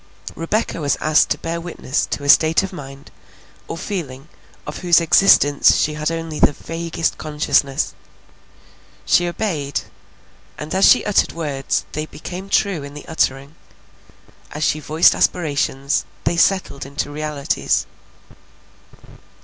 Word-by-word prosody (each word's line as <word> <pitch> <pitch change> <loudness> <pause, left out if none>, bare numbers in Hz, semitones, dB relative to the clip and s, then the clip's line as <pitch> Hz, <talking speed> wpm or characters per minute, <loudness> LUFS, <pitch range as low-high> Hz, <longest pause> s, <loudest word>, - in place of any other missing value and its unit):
Rebecca 170 0 -2
was 145 -1 0
asked 155 0 +3
to - - 0
bear 170 +1 -4
witness 165 -5 -3
to 145 - -4
a - - -4
state 160 +5 +5
of 195 - -5
mind 140 -4 -10 0.6
or - - -5
feeling 155 -7 -6 0.4
of - - -6
whose 175 -2 +4
existence 160 -4 +5
she 150 - +1
had 150 0 -2
only 165 -2 -4
the - - +4
vaguest 165 +2 -3
consciousness. 150 -3 0 1.1
She 175 +12 +3
obeyed, 165 -7 -2 0.8
and 150 - -6
as 190 +1 +4
she - - +5
uttered 210 - +2
words 145 -5 -2
they 155 +1 -4
became 185 +5 -8
true 195 -6 +1
in 140 +1 -9
the 150 - -10
uttering; 140 -2 -1 1.0
as 150 - -4
she 155 - +1
voiced 155 +3 +4
aspirations 145 -4 0 0.2
they 165 - 0
settled 170 -5 +1
into 140 +1 -4
realities. 150 -1 -1
155 Hz, 135 wpm, -20 LUFS, 145-170 Hz, 1.1 s, state